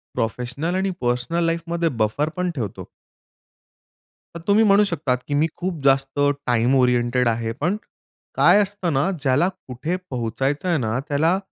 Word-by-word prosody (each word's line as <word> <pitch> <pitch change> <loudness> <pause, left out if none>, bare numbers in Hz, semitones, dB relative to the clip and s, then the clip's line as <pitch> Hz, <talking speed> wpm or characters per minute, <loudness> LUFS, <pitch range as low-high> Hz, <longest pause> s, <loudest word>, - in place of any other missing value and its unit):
Professional 125 +9 -2
आणि 190 +1 0
personal 125 +8 0
लाईफमध्ये 170 0 -1
buffer 145 +9 0
पण 180 0 0
ठेवतो. 115 -8 -5 1.5
तर - - -6
तुम्ही 205 +2 +4
म्हणू 205 0 +5
शकता 145 -9 -1
की 125 +3 -5
मी 160 - +3
खूप 185 0 -3
जास्त 135 0 +2 0.3
टाईम 120 +1 +2
ओरिएंटेड 125 -1 +2
आहे, 115 0 -1
पण 170 - -1 0.6
काय 210 - +5
असतं 190 -4 -2
ना, 145 +7 +1
ज्याला 140 +6 +2
कुठे 155 -1 -5
पोहचायचं 135 +7 -2
आहे 170 -3 +2
ना, 115 -1 -1
त्याला 160 +5 +2
145 Hz, 145 wpm, -22 LUFS, 125-175 Hz, 1.5 s, म्हणू